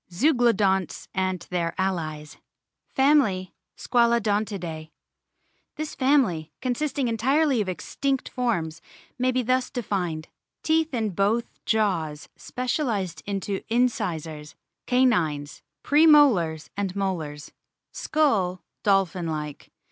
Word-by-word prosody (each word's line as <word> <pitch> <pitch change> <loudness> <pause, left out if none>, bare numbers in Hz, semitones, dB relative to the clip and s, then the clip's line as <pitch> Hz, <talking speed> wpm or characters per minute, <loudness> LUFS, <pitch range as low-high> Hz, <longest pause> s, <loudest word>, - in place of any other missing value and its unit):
ZEUGLODONTS 210 - +2
AND 185 -2 -1
THEIR 170 -2 -1
ALLIES 155 -5 -3 0.6
FAMILY, 265 - +3 0.2
SQUALODONTIDAE 205 -9 0 0.9
THIS 310 -1 -5
family, 245 - +2
consisting 265 +1 -1
entirely 260 +3 +2
of 195 - -2
extinct 270 - -2
forms, 170 -11 -2 0.4
may 255 +1 +2
be 255 0 0
thus 255 +1 +1
defined: 180 - -3 0.4
Teeth 320 0 +2
in 220 -3 -1
both 205 +6 -1
jaws 175 -9 0
specialised 230 - -2
into 200 -1 -2
incisors, 165 -11 -1 0.3
canines, 170 - +1 0.2
pre 305 +3 +5
molars, 195 - +4
and 200 -2 -3
molars. 160 -7 -3 0.4
Skull, 205 -13 0 0.2
dolphin 190 -4 +1
like. 150 -2 -5
200 Hz, 95 wpm, -25 LUFS, 170-250 Hz, 0.9 s, pre